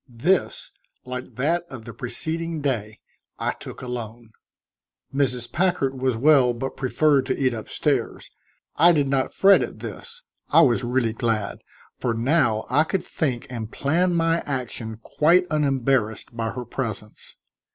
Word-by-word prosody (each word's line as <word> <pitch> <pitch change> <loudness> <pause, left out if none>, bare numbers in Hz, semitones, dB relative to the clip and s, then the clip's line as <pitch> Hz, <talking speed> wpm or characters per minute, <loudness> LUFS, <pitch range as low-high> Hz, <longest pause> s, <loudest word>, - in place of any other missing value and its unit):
This, 155 +11 0 0.3
like 125 0 -6
that 165 +7 +1
of 120 -4 -9
the 115 - -8
preceding 160 +5 -3
day, 110 -7 -2 0.4
I - - -1
took - - -10
alone. 120 -2 -6 0.8
Mrs. 125 -4 0
Packard 140 -7 0
was 130 -3 +1
well 130 -2 +5
but 135 +3 -4
preferred 140 +1 +2
to - - 0
eat 130 -3 +1
up 110 -2 -7
stairs. - - -1 0.5
I 170 +3 +7
did 145 -3 +2
not 135 -1 0
fret 195 0 +6
at - - -4
this; 480 +1 -8 0.3
I - - +6
was 125 -2 +3
really 120 -2 0
glad, 115 -3 -1 0.4
for 120 -2 0
now 120 -3 +2
I 145 +5 +3
could 180 +3 -2
think 130 -7 -2
and 115 -2 -5
plan 175 +5 +1
my 165 0 +2
action 120 -5 -4
quite 175 +4 +3
unembarrassed 135 -7 0
by 115 -1 -2
her 125 +2 -6
presence. 110 -4 -6
130 Hz, 150 wpm, -24 LUFS, 120-155 Hz, 0.8 s, I